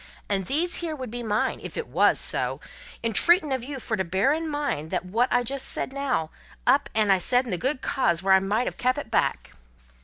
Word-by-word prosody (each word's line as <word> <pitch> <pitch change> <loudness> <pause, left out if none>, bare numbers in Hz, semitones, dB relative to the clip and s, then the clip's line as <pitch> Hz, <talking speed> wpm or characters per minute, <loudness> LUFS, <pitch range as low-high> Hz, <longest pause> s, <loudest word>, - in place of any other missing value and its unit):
And 195 -3 -1
these 335 +5 0
here 330 -3 -3
would 255 -5 -6
be 240 0 -4
mine, 215 -2 0
if - - -8
it 470 - -2
wos - - +3
so, - - -2 0.4
entreatin' 305 - +3
of 260 -3 -1
you 275 +1 -6
fur 230 - -2
to 190 - +1
bear 190 - +2
in 320 +1 -2
mind 290 - -2
that - - -2
wot 230 +7 +1
I 245 - +4
said - - -9
just 270 +1 -3
now, 270 - -1 0.3
I - - +6
up 280 +1 0
and 200 -4 +3
said 250 +6 +2
in 235 - -5
the 180 - 0
good 265 +1 -1
cause 175 -10 +1
when 195 0 +5
I 190 - +7
might 205 +6 0
have - - -4
kep' 255 +2 +1
it 280 -6 -6
back." - - 0
245 Hz, 235 wpm, -25 LUFS, 200-280 Hz, 0.4 s, I